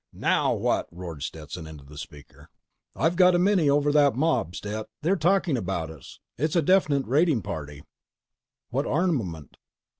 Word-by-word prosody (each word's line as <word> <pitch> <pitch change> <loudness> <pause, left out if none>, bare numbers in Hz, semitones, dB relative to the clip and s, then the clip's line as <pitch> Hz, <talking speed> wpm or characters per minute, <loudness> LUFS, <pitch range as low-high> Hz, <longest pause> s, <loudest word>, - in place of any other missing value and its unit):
"NOW - - +1
WHAT?" - - 0
roared 85 -4 -8
Stetson 80 +2 -7
into 75 -3 -11
the 75 +2 -14
speaker. 75 -1 -12 0.5
"I've 165 +2 +1
got 180 0 +5
a - - +4
mini 180 -4 +3
over 145 +1 +3
that 145 -4 +4
mob, 135 - 0
Stet. 105 +1 -5 0.2
They're 180 +5 +3
talking 180 -2 +2
about 90 -6 -3
us. 80 -5 -13 0.2
It's 155 +4 0
a 170 - +3
definite 150 -6 +3
raiding 145 - +2
party." 75 -3 -6 0.9
"What 135 +4 -1
armament?" 125 - -1
130 Hz, 155 wpm, -26 LUFS, -, 0.9 s, got